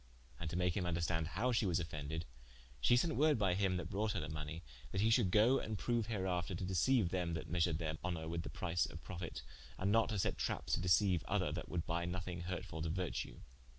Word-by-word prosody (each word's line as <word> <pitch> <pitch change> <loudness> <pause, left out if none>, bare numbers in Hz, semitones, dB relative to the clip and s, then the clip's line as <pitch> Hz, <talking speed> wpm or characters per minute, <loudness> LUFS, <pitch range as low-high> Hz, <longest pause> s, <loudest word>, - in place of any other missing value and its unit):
And 80 - -3
to - - -4
make 90 -1 +2
him 95 - 0
vnderstande 85 -1 0
howe 125 +8 0
she 110 -3 +2
was 90 -1 +2
offended, 80 0 -4 0.5
shee 70 - +5
sent 160 +6 +2
woorde 150 -1 +4
by 100 -4 +2
him 95 -1 +1
that 85 -1 -5
brought 105 +1 0
her 100 - -1
the 80 +1 -4
money, 75 +1 -5 0.3
that 95 - 0
he 110 +2 +4
should 115 -5 +4
goe 110 +7 +5
and 110 -1 -3
proue 120 +1 +1
hereafter 95 -4 -1
to 90 - -3
deceiue 100 +4 +3
them 85 -2 -1
that 80 - -5
measured 85 -2 +2
their 80 -1 -3
honour 85 -3 -2
with 85 +1 -2
the - - -6
price 85 -1 0
of - - -9
profite, 85 -6 -6 0.3
and 95 +2 +1
not 115 +1 +4
to 110 - -1
sette 95 - 0
trappes - - -2
to - - +3
deceiue 90 0 +4
other - - +1
that - - -5
would 85 -2 -2
buye 85 +1 -1
nothing 90 -1 -4
hurtfull 85 -2 -4
to 80 - -1
vertue. 90 +1 -3
90 Hz, 230 wpm, -37 LUFS, 85-100 Hz, 0.5 s, shee